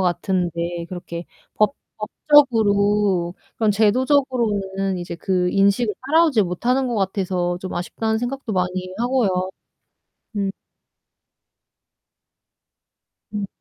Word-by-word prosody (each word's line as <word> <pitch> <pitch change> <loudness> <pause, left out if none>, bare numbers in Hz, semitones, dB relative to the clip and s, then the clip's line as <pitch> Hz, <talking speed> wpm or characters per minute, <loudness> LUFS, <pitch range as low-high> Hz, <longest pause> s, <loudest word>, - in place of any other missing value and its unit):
같은데 175 -2 -1
그렇게 175 -1 -6 0.3
법 215 +6 +2 0.2
법적으로 210 - +3 0.2
그런 220 -2 +2
제도적으로는 210 -5 +1
이제 175 -1 -5
그 180 0 0
인식을 200 +3 +2
따라오지 310 -7 +4
못하는 245 +9 0
것 245 - -2
같아서 185 -3 -1
좀 185 - -5
아쉽다는 220 +5 -1
생각도 245 0 -4
많이 185 0 -1
하고요. 215 -7 +1 0.9
음. 200 -1 0 2.8
음. 205 -1 -2
200 Hz, 225 characters per minute, -22 LUFS, 180-235 Hz, 2.8 s, 따라오지